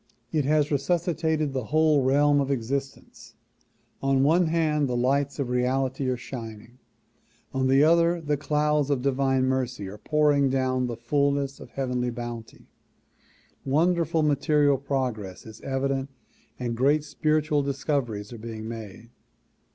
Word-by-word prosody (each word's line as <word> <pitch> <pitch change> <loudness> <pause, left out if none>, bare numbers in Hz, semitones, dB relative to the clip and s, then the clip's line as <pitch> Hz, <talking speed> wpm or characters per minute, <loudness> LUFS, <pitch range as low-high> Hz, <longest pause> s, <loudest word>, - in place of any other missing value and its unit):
It 150 -4 0
has 150 +1 +2
resuscitated 160 -1 0
the 130 -4 -2
whole 155 0 +3
realm 145 +2 +3
of 135 - -2
existence. 135 +2 -4 0.7
On 135 -1 +2
one 165 +4 +3
hand 155 -3 +1
the 120 - -1
lights 140 +3 +1
of 140 -4 -2
reality 130 +2 0
are 125 - -1
shining; 120 -1 -9 0.7
on 130 0 +1
the 135 +2 +5
other 170 +2 +4
the 150 -2 -1
clouds 150 0 0
of 135 -3 0
divine 135 -1 +1
mercy 130 -5 -2
are 105 +2 -9
pouring 145 0 +2
down 130 -1 0
the 120 -2 -5
fullness 140 +2 0
of - - -11
heavenly 125 -2 -2
bounty. 120 -1 -7 1.0
Wonderful 165 +2 +1
material 145 -1 +2
progress 125 -9 -3
is 110 -1 -12
evident 135 0 -2 0.5
and 120 -2 -3
great 145 +5 +2
spiritual 155 0 0
discoveries 135 -6 -2
are 115 - -9
being 110 -1 -7
made. 115 0 -9
135 Hz, 135 wpm, -26 LUFS, 125-150 Hz, 1.0 s, the